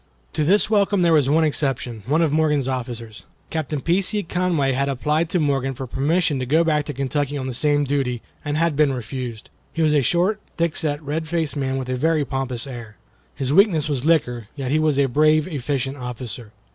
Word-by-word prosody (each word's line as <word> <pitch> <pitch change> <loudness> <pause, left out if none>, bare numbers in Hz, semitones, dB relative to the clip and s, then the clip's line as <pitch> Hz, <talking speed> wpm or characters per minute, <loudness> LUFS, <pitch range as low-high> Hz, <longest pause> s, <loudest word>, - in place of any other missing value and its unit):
To 155 - 0
this 195 +7 +4
welcome 205 -3 +2
there 170 -1 +4
was 145 -4 +3
one 160 +3 +4
exception. 135 -6 -1
One 155 +5 +3
of 155 - +1
Morgan's 150 -3 +1
officers, 120 -4 -5 0.3
Captain 155 -3 -2
P. 175 +6 +2
C. 205 +2 +1
Conway, 170 -6 0
had 140 +2 0
applied 150 +5 0
to 180 - +1
Morgan 135 -3 0
for 130 - -5
permission 145 +3 0
to 130 - -2
go 160 +5 +4
back 150 -3 +1
to 145 - -5
Kentucky 145 +1 -1
on 130 - -4
this 125 -2 -4
same 145 -1 +2
duty, 135 -4 -1 0.2
and 145 0 -2
had 165 -1 +1
been 145 -2 +3
refused. 125 -2 -6 0.2
He 165 - -1
was 155 -1 +3
a 145 - +4
short, 175 - +1 0.2
thickset, 155 -3 -1
red 155 +3 -3
faced 160 -4 -1
man 135 -2 -1
with 130 -1 -4
a 130 0 -2
very 155 +1 +1
pompous 130 -3 -3
air. 120 -6 -9 0.4
His 135 0 -1
weakness 175 -5 +4
was 140 -4 -1
liquor; 125 -9 +1
yet 135 -3 -3
he 155 - +3
was 155 -3 +2
a 140 - +4
brave, 155 +4 +3
efficient 140 -3 -2
officer. 125 -3 -7
145 Hz, 210 wpm, -22 LUFS, 130-160 Hz, 0.4 s, this